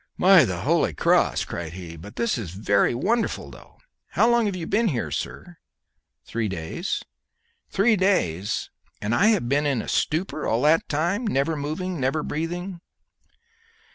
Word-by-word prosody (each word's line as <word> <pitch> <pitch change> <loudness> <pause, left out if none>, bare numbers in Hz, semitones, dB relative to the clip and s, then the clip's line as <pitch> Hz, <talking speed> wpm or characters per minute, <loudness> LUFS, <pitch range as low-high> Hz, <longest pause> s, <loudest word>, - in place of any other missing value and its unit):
"By 185 -5 +7
the 90 -5 -3
holy - - +1
cross," - - +2
cried 85 -1 -6
he, 90 -3 -8
"but 105 +8 -11
this 235 -2 0
is 110 -8 -5
very 100 +4 +1
wonderful, 225 - -1
though. - - -16 0.4
How - - +4
long 235 -2 +3
have 200 - -2
you 175 -3 -4
been 220 +6 +1
here, 130 - -2
sir?" 175 -2 -5 0.7
"Three 115 -1 -2
days." 95 - -3 0.7
"Three 220 +3 +3
days! 105 - 0 0.3
and 105 +3 -2
I 200 - +4
have 210 - +2
been 145 +3 +1
in 135 -4 +1
a - - -5
stupor 155 -1 -1
all 115 +2 +1
that 155 +2 +3
time 175 +10 0
never 155 -2 +1
moving, 155 +4 -3
never 135 +4 0
breathing?" 175 +3 -4
155 Hz, 160 wpm, -24 LUFS, -, 0.7 s, By